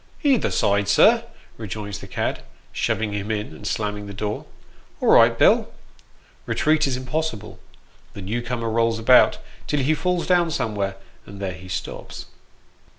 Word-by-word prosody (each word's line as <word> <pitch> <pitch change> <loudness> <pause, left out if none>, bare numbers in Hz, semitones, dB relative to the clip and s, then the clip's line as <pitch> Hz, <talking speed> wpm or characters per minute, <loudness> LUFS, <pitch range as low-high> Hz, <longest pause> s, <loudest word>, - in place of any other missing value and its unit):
" - - -27
Either 275 -6 +3
side, 100 0 +1
sir," 100 - +5 0.3
rejoins 105 -2 -6
the - - -10
cad, - - -3 0.3
shoving 105 0 -1
him 100 +1 -4
in, 105 -1 -3
and 105 - -8
slamming 105 -2 -3
the 100 - -8
door. 105 +1 -4 0.2
" - - -30
All - - +1
right, - - +6
Bill." - - +4 0.8
Eetreat 155 -1 +2
is 130 -2 -1
impossible; 130 -5 -4 0.5
the 100 - -8
new 110 +6 -2
comer 120 -2 -3
rolls 115 0 +1
about, 120 +3 +5 0.3
till 145 -1 0
he 145 +4 +2
falls 180 +2 -1
down 175 -2 +3
somewhere, 100 -9 -2 0.3
and 100 0 -10
there 95 -2 -3
he 90 +2 -12
stops. 90 +1 -6
110 Hz, 160 wpm, -23 LUFS, 100-135 Hz, 0.8 s, right